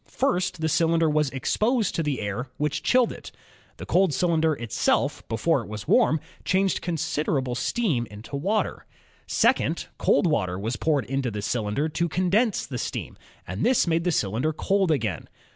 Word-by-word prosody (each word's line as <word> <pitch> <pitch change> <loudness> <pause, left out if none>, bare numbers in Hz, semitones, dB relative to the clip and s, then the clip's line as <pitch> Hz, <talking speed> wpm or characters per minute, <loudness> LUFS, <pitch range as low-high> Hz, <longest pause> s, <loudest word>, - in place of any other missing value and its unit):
First, 185 -10 0
the 160 - +1
cylinder 165 +1 +2
jwas 150 -2 +1
exposed 215 - 0
to - - 0
the 150 -6 -2
air, 105 +6 -3
which 150 0 -1
chilled 250 -1 +3
it. - - -10 0.5
The - - -7
cold 185 -5 +2
cyl 180 - +1
^inder 160 -2 +1
itself, 120 -3 0
before - - +1
it - - -10
was 105 -1 -7
warm, 155 - +4 0.2
changed 190 0 +1
considerable 150 -6 -1
steam 125 - 0
into 105 +7 -9
water. 195 +10 -1 0.4
Second, - - +1
cold - - +3
water 100 - 0
was 110 +5 -2
poured 145 -7 0
into 135 +2 -1
the 105 -2 -5
cylinder 110 +6 -1
to 170 +2 -1
condense 190 +6 +1
the 125 -2 -5
steam, - - -4 0.3
and 95 +5 -4
this 255 -1 +3
made 165 -1 +1
the 180 - +1
cylinder 115 - 0
cold 195 +3 +1
again. 110 - -1
150 Hz, 170 wpm, -25 LUFS, 120-180 Hz, 0.5 s, warm